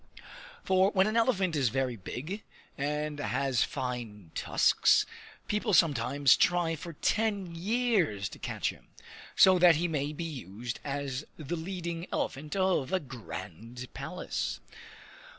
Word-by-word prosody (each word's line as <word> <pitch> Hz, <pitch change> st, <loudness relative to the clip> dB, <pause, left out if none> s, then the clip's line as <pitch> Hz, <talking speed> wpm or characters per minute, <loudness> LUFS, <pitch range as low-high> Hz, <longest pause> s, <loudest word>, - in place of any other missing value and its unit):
For 190 Hz, +1 st, +4 dB
when 190 Hz, -2 st, +3 dB
an 215 Hz, +2 st, -1 dB
elephant 195 Hz, -8 st, +2 dB
is 135 Hz, -5 st, +2 dB
very 130 Hz, 0 st, -1 dB
big 150 Hz, -, -6 dB, 0.3 s
and 150 Hz, +1 st, -2 dB
has 130 Hz, +1 st, +1 dB
fine 115 Hz, -8 st, -5 dB
tusks, -, -, +3 dB, 0.4 s
people 210 Hz, -1 st, +1 dB
sometimes 140 Hz, -3 st, +4 dB
try 175 Hz, -2 st, +2 dB
for 170 Hz, +2 st, -8 dB
ten 200 Hz, +1 st, 0 dB
years 190 Hz, -, +1 dB
to -, -, -11 dB
catch -, -, -2 dB
him, -, -, -18 dB, 0.5 s
so 185 Hz, -1 st, +7 dB
that 175 Hz, -2 st, +7 dB
he 170 Hz, +3 st, +1 dB
may 150 Hz, -3 st, -1 dB
be 155 Hz, +3 st, -5 dB
used 120 Hz, -, -6 dB
as 140 Hz, -1 st, -3 dB
the 155 Hz, +2 st, -4 dB
leading 170 Hz, 0 st, -4 dB
elephant 150 Hz, +5 st, -3 dB
of 185 Hz, -7 st, +1 dB
a 190 Hz, -, +2 dB
grand 120 Hz, -, -8 dB
palace. -, -, -4 dB
150 Hz, 135 wpm, -30 LUFS, 125-185 Hz, 0.5 s, so